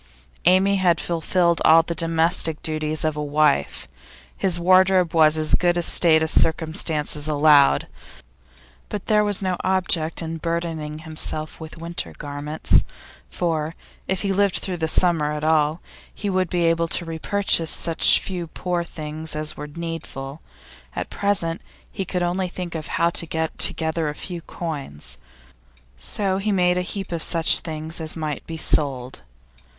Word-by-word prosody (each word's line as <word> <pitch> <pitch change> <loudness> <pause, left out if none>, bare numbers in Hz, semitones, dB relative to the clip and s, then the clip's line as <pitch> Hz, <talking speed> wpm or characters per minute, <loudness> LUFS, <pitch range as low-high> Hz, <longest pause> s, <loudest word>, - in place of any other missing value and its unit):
Amy 190 +3 +4
had 180 -3 +2
fulfilled 170 0 0
all 165 +1 +6
the 170 - -4
domestic 165 -1 +1
duties 155 0 -2
of 155 -1 0
a 150 - -3
wife; 145 - +1 0.5
his 180 -3 +1
wardrobe 185 0 +4
was 160 -1 +5
in - - 0
as 155 - 0
good 175 -1 +3
a 175 - 0
state 160 -2 +4
as 160 - +1
circumstances 155 -2 +1
allowed. 145 -2 +4 1.0
But 205 - -5
there 210 -1 +3
was 205 -1 +1
no 185 -1 -1
object 175 -4 0
in 165 0 -4
burdening 160 -2 -4
himself 155 0 -3
with 160 0 -9
winter 170 +1 -5
garments, 145 +1 0 0.5
for, 160 - -2 0.3
if 190 -1 -1
he 195 -1 0
lived 200 -1 +2
through 185 -2 -2
the 160 -1 -1
summer 160 -2 +2
at 150 0 -5
all, 155 +1 +2 0.3
he 205 -1 -4
would 185 -2 0
be 175 -1 0
able 165 0 +2
to 170 - -1
repurchase 165 +1 0
such 165 -1 +4
few 180 -3 -5
poor 175 +1 -3
things 155 -1 -4
as 155 0 -2
were 150 - -7
needful; 155 -3 -7 0.5
at - - -5
present 175 -5 0 0.3
he 195 - -4
could 180 0 -2
only 180 +2 -1
think 180 -1 -6
of 160 -1 -5
how 170 0 +1
to 170 - +1
get 160 0 -2
together 160 -1 +1
a 150 - -6
few 175 0 -7
coins. 145 - -6 0.8
So 190 - -2
he 210 +2 -1
made 180 -2 +2
a - - 0
heap 195 +1 -5
of 170 -1 -2
such 165 0 +3
things 160 0 -3
as 160 +1 -4
might 155 -3 -4
be 165 - -6
sold. 130 - 0
165 Hz, 160 wpm, -22 LUFS, 155-180 Hz, 1.0 s, all